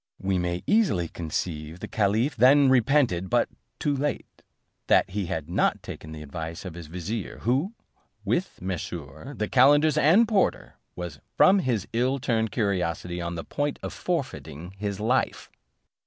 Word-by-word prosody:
We 95 -1 0
may 90 0 -2
easily 195 - +2
conceive 80 0 -4
the - - -6
caliph 110 +7 +1
then 135 +4 +6
repented, 125 -8 +3
but - - +2 0.3
too 145 -1 0
late, 145 +2 -3 0.5
that - - +4
he 100 -2 -2
had 80 -5 -3
not 85 - +1
taken 80 - -8
the 75 -1 -8
advice 80 +4 -6
of 90 - -6
his 85 -2 -9
vizier, 90 +6 -5
who, 140 - 0 0.5
with 180 +2 -1
Mesrour, 90 - -6
the 105 - -1
calenders 145 +4 +5
and 190 +10 +5
porter, 210 -4 +1 0.2
was 85 -4 -6 0.2
from 195 +2 +6
his 120 - -1
ill 125 +4 +1
timed 115 -4 0
curiosity 90 -4 -1
on 85 0 -3
the 80 - -5
point 145 0 -2
of - - -4
forfeiting 130 - -4
his 100 0 -4
life. 125 +5 0
105 Hz, 155 wpm, -26 LUFS, 85-135 Hz, 0.5 s, then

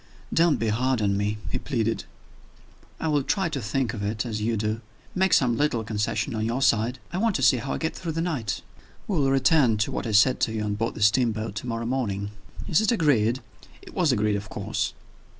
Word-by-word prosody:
"Don't 165 -2 +4
be 115 - 0
hard 125 +3 +1
on 100 -2 +1
me," 105 +1 -1
he - - -1
pleaded. 115 -5 -1 0.9
"I - - -2
will 150 -2 +2
try 190 +6 0
to 140 -4 -3
think 115 +2 -1
of 105 - -5
it 105 +3 -2
as 110 -3 -3
you 115 +1 0
do. 110 +2 -1 0.3
Make 190 0 +2
some 125 -3 +4
little 125 -4 +1
concession 105 +4 -1
on 110 -1 -2
your 120 +4 0
side. 115 +1 +2 0.2
I 180 - -1
want 225 -1 +1
to 135 - 0
see 125 0 +6
how 135 +3 -3
I - - -2
get 160 - -2
through 165 -3 -4
the 165 - -3
night. 145 - -2 0.4
We 190 -6 0
will 135 -1 +2
return 135 -3 +4
to 105 - 0
what - - -3
I - - -2
said 125 +5 +5
to 110 - 0
you 110 -1 -2
on 105 -1 -1
board 115 +3 -2
the 105 - -1
steamboat 110 -1 +2
to 125 - -5
morrow 115 0 -2
morning. 105 -6 -2 0.4
Is 165 - +3
it 220 - +2
agreed?" 130 - +2 0.4
It - - -12
was 170 -5 +2
agreed, 105 -3 +1
of 100 +1 -7
course. - - -2
115 Hz, 225 wpm, -25 LUFS, 105-140 Hz, 0.9 s, see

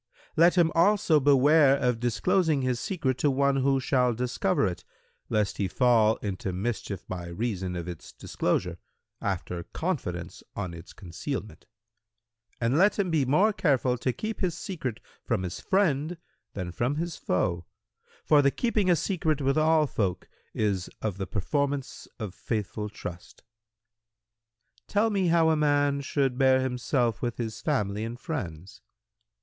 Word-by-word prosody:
Let 170 +3 +5
him 165 -2 +4
also 170 -3 +4
beware 140 +1 +5
of 125 -4 0
disclosing 150 - +1
his 125 -2 0
secret 135 -9 -2
to 145 - +3
one 140 0 +2
who 135 0 +2
shall 125 -3 +1
discover 120 -4 0
it, 90 -3 -3 0.5
lest 105 -2 0
he 100 - 0
fall 115 0 +3
into 95 -2 -3
mischief 100 -1 -4
by 90 -2 -5
reason 95 -1 -3
of 85 -1 -5
its 85 -3 -8
disclosure, - - -2 0.4
after 90 -3 -3
confidence - - -4
on 95 -4 -4
its 85 -1 -11
concealment; 105 - -6 0.9
and 120 +6 +1
let 200 +3 +4
him 190 -4 0
be 150 -4 +2
more 185 - +3
careful 140 - +2
to 130 - 0
keep 215 - -5
his 175 -3 -1
secret 135 - -4 0.2
from 95 - -1
his 90 -2 -5
friend 170 -4 +1 0.4
than 90 -3 -4
from 120 +10 -1
his 170 +1 -3
foe; 85 -1 -1 0.6
for 150 -1 +6
the 140 - +4
keeping 215 - 0
a 175 - +6
secret 160 -3 0
with 135 -1 +1
all 155 0 +4
folk 95 -9 -2 0.3
is 100 -4 0
of 100 -3 -2
the 95 - -3
performance 140 - -2
of 105 -6 -5
faithful 105 0 -3
trust." 90 -4 -9
Q 110 -1 -44
"Tell 210 +2 +3
me 195 -3 +1
how 165 -1 +4
a - - +3
man 145 -2 +2
should 135 -2 -1
bear 130 -1 +5
himself 125 -2 0
with 120 -2 -2
his 115 -2 -4
family 105 -8 -1
and 115 +2 -5
friends." 95 - -6
125 Hz, 155 wpm, -27 LUFS, 105-150 Hz, 0.9 s, for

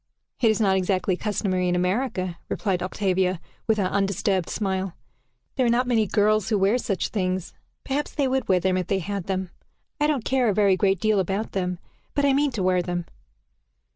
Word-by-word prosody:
"It 230 - +5
is 220 - +2
not 195 -3 +3
exactly 185 0 +1
customary 185 -2 -1
in 175 - +1
America," 185 -1 -1
replied 190 -4 -1
Octavia, 185 -1 0 0.3
with 220 -1 +3
her 200 - +1
undisturbed 195 -1 0
smile. 190 -3 -2 0.6
"There 260 - +2
are - - +3
not 240 +2 +2
many 225 -4 +2
girls 215 +1 +2
who 205 -4 +2
have 235 +5 +2
such 195 -3 -1
things. 185 -3 -2 0.3
Perhaps 280 +2 -2
they 280 -2 +1
would 265 0 0
wear 185 -1 +4
them 185 +1 +1
if 180 -2 -2
they 195 - +1
had 195 0 -4
them. 190 -2 -2 0.5
I 295 - +3
don't 285 -7 0
care 260 -3 +2
a 200 - 0
very 200 -2 +4
great 190 0 +2
deal 215 +1 +2
about 195 +4 -1
them, 180 -2 -2 0.4
but 285 - +2
I 275 - +4
mean 285 +1 +3
to 205 -5 -2
wear 185 -1 +3
them." 175 -1 -3
195 Hz, 200 wpm, -24 LUFS, 185-220 Hz, 0.6 s, It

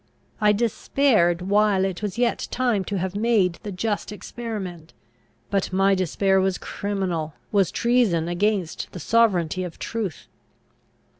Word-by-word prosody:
I 210 0 +5
despaired, 215 -4 +2
while 200 0 +3
it 190 -1 -3
was 205 -2 -3
yet 240 -1 0
time 240 -6 +1
to 200 - -2
have 190 +1 -3
made 205 -6 +2
the 205 - -6
just 205 +2 -2
experiment; 200 -5 -6 0.6
but 195 -2 0
my 195 +1 +3
despair 190 +1 +2
was 190 -1 0
criminal, 180 -6 -3 0.2
was 195 -4 +3
treason 235 -9 +2
against 185 -1 -1
the 180 - -6
sovereignty 185 -4 +2
of 175 -2 -7
truth. 215 -8 -4
195 Hz, 135 wpm, -24 LUFS, 180-215 Hz, 0.6 s, I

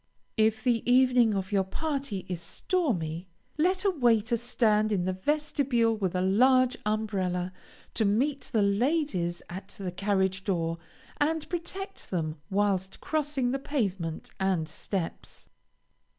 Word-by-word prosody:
If 220 0 +2
the 235 -3 +2
evening 250 -4 +5
of 190 0 -3
your 195 -2 +3
party 270 - -3
is 180 -2 -4
stormy, 180 - -2 0.3
let 370 +5 +2
a 395 - +5
waiter 235 - +2
stand 220 -2 +2
in 185 -4 +1
the 185 - 0
vestibule 255 0 +1
with 190 -4 -2
a 180 - +1
large 255 +7 +4
umbrella, 190 -4 -1 0.4
to 225 - +2
meet 260 +8 +1
the 220 -4 +3
ladies 200 - +1
at 190 +2 -7
the 190 -3 -4
carriage 190 0 0
door, 165 -4 -1 0.4
and 310 +1 0
protect 385 +3 -5
them 155 -4 -2
whilst 195 -1 0
crossing 295 -5 -1
the 270 - -1
pavement 195 - -2
and 190 -5 +1
steps. 170 +2 -5
215 Hz, 135 wpm, -28 LUFS, 185-265 Hz, 0.4 s, evening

